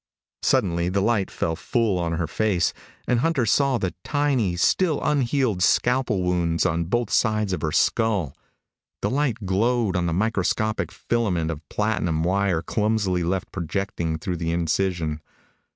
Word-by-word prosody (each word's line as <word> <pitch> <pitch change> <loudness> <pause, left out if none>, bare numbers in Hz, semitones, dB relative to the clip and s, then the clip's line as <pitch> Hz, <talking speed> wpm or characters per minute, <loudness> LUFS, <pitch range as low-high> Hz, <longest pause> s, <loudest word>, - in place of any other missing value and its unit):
Suddenly 90 -9 +1
the 95 +2 0
light 105 -1 +1
fell 80 - -2
full 110 -1 0
on 85 -1 -1
her 85 0 -1
face, 90 0 0 0.3
and 125 - +2
Hunter 140 -3 +1
saw 135 +3 +2
the 95 -5 -2
tiny, 135 -11 +1
still 155 - +2
unhealed 130 -8 +1
scalpel 120 -2 +2
wounds 85 -2 +1
on 85 0 0
both 120 +5 -1
sides 110 -3 +1
of - - -3
her 80 - -1
skull. 100 - +1 0.7
The - - +1
light 130 -6 -1
glowed 110 +2 +1
on 90 -1 +1
the - - 0
microscopic 110 +2 0
filament 90 -9 -1
of 80 -1 -9
platinum 95 -7 0
wire 95 -2 +1
clumsily 105 -3 0
left 90 +2 -2
projecting 85 -2 -3
through 90 +2 -3
the 85 0 -2
incision. 85 -2 -1
95 Hz, 150 wpm, -24 LUFS, 85-115 Hz, 0.7 s, and